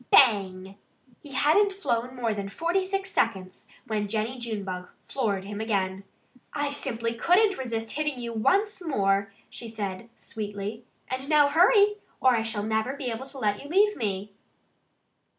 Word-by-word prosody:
BANG! 195 -5 +4 0.4
He 285 -2 -11
hadn't 310 +10 +4
flown 250 -10 -2
longer 230 -3 0
than 200 -1 -4
forty 340 - 0
six 390 0 -2
seconds 190 -5 -1 0.2
when 215 -3 -1
Jennie 220 +4 -2
Junebug 200 -6 -4
floored 205 -8 -2
him 205 +2 -5
again. 195 -3 -1 0.5
"I 290 -1 -1
simply 230 -5 -2
couldn't 370 - +3
resist 225 -3 -3
hitting 300 -2 -1
you 235 -1 -5
once 390 - +1
more!" 200 - +1 0.2
she 235 - -7
said 210 -1 -5
sweetly. 210 +1 -6 0.2
"And 260 +2 -4
now, 295 -2 +6
hurry! 410 +6 +5 0.2
Or 255 -1 +5
I 225 - +1
shall 225 -2 -1
never 220 +5 0
be 260 -4 -3
able 230 +4 -5
to 270 +1 -6
let 210 -4 0
you 285 - -10
leave 415 +5 +4
me." 200 -3 -3
230 Hz, 155 wpm, -27 LUFS, 205-290 Hz, 0.5 s, now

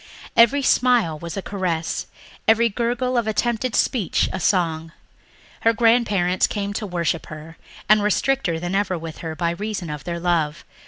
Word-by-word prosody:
Every 255 +4 +5
smile 240 -13 +2
was 170 +3 -6
a 195 - -3
caress, 180 -5 -2 0.4
every 230 +1 +4
gurgle 245 +3 0
of 225 - -3
attempted 235 +2 -1
speech 220 -9 +1
a 190 - -3
song. 165 -4 0 0.7
Her 230 - +3
grandparents 210 -6 +2
came 200 -1 -3
to 210 +1 -4
worship 170 -3 -2
her 155 +1 -10 0.3
and 215 0 +5
were 210 - +2
stricter 210 -7 0
than 175 +2 -4
ever 195 -2 0
with 165 -1 -8
her 160 -1 -5
by 170 0 0
reason 195 -2 -4
of 150 -3 -6
their 170 -1 -4
love. 165 -4 -1
195 Hz, 165 wpm, -22 LUFS, 170-230 Hz, 0.7 s, Every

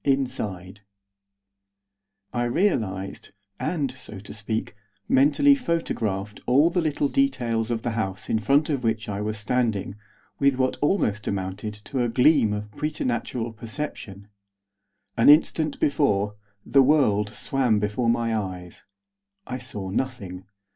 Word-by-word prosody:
INSIDE 110 -9 -2 1.5
I 120 -1 0
realised, 110 - -1 0.3
and, 150 -4 -1
so 115 -5 -8
to 100 +1 -10
speak, 110 0 -3 0.3
mentally 145 - +5
photographed 110 - -2
all 145 +7 +5
the 180 - +1
little 150 -2 0
details 120 - 0
of 115 -2 -2
the 120 - -1
house 105 -3 -3
in 110 - +1
front 140 +9 +2
of 135 -3 -1
which 110 -1 -1
I 100 0 -3
was 110 +1 -2
standing 110 -3 0 0.5
with 140 -1 +3
what 130 0 0
almost 110 - +1
amounted 100 +2 -3
to 130 +3 -2
a 120 - +1
gleam 125 -2 +4
of 105 0 -4
preternatural 120 -4 -2
perception. 110 -4 -6 0.9
An 115 - +6
instant 155 0 +4
before, 105 -9 +1 0.3
the 135 - +5
world 125 -8 +3
swam 125 0 +1
before 105 +3 0
my 115 -1 +1
eyes. 90 -4 -5 0.6
I 125 0 -5
saw 95 -5 -5
nothing. 100 -6 -4
115 Hz, 130 wpm, -25 LUFS, 105-140 Hz, 1.5 s, An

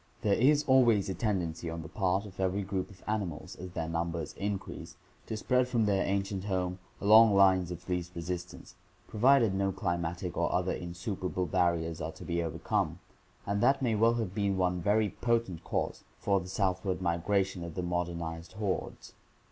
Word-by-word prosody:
— - - -32
There 105 - +3
is 145 +6 +4
always 120 -8 +4
a - - -1
tendency 90 -6 -2
on 80 0 -5
the - - -8
part 95 +3 0
of 95 -2 -12
every 95 +1 0
group 95 -1 -3
of 100 - -16
animals, 100 -7 -3
as 90 +1 -7
their 80 - -3
numbers 85 -1 -3
increase, 100 -1 -5 0.3
to 110 - -3
spread 125 +3 +2
from 120 -3 +1
their 100 -2 +2
ancient 100 0 -1
home 90 -2 -1 0.2
along 110 +1 +7
lines 95 -2 +5
of 90 -1 -8
least 90 -1 -3
resistance, 90 +1 -6 0.3
provided 120 -1 +4
no 95 0 +1
climatic 85 -1 -2
or - - 0
other 90 +1 +1
insuperable 90 +1 -3
barriers 85 -1 0
are 80 +1 -4
to - - -11
be 85 -1 -1
overcome, 80 -2 -1 0.5
and 100 +1 -1
that 135 +2 +3
may 120 -3 +2
well 115 +2 +4
have 110 -6 -2
been 100 -2 0
one 90 -1 +1
very 105 +4 +3
potent 115 -8 0
cause - - -2
for 100 -1 +1
the 90 - -8
southward 95 -1 0
migration 95 +1 0
of 85 -2 -7
the 90 - -2
modernized 85 -1 -3
hordes. 105 -3 -4
95 Hz, 180 wpm, -30 LUFS, 85-105 Hz, 0.5 s, along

